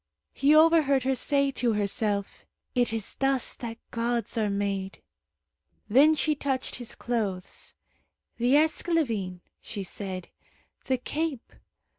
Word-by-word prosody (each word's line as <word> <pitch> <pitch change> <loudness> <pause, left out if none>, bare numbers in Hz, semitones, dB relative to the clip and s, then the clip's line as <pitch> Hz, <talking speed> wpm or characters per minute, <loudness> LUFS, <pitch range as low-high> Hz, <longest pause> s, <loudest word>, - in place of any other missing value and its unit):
He 285 +3 +4
overheard 310 -4 +5
her 265 +1 +2
say 280 +2 +1
to 245 -3 0
herself, 205 0 -1 0.3
"It 245 -3 +2
is 225 -3 -2
thus 270 -2 +2
that 230 -2 -6
gods 235 -1 -1
are 215 -2 +1
made." 200 -1 -3 0.9
Then 290 +8 +6
she 310 0 +1
touched 275 -2 -2
his 245 -3 -6
clothes. 205 -7 -3 0.6
"The 245 +3 +3
esclavine," 280 - +1 0.2
she 205 -3 -6
said, 185 -1 -5 0.6
"the 260 - +1
cape. 295 0 -4
240 Hz, 120 wpm, -27 LUFS, 205-280 Hz, 0.9 s, Then